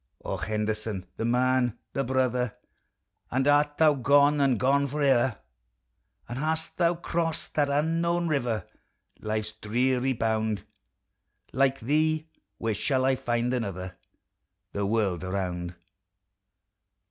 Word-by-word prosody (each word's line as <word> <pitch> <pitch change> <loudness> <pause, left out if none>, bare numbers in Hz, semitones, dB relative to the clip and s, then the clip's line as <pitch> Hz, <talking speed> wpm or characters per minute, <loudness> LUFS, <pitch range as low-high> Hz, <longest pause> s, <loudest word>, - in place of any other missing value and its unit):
O - - -2
Henderson, 105 -2 -2
the 115 - -2
man! 125 0 +2 0.2
the 135 - 0
brother! 125 -3 0 0.7
And 130 +2 0
art 145 0 +3
thou 155 -2 +6
gone, 145 +2 +4
and 130 -5 +3
gone 140 +2 +3
forever! 135 -5 +2 0.9
And 120 +2 -5
hast 160 +2 -2
thou 170 -1 +3
crost 165 -1 -2
that 145 -2 +2
unknown 165 +4 +1
river, 120 -8 -1 0.5
Life's 110 0 -2
dreary 125 +4 0
bound! 110 -3 -1 0.9
Like 135 0 +2
thee 155 +5 +1 0.3
where 115 -1 -1
shall 130 +5 0
I 135 0 +3
find 120 -1 -1
another, 95 -6 -3 0.8
The 100 -1 -1
world 100 -5 0
around 90 -2 -3
130 Hz, 115 wpm, -27 LUFS, 110-145 Hz, 0.9 s, thou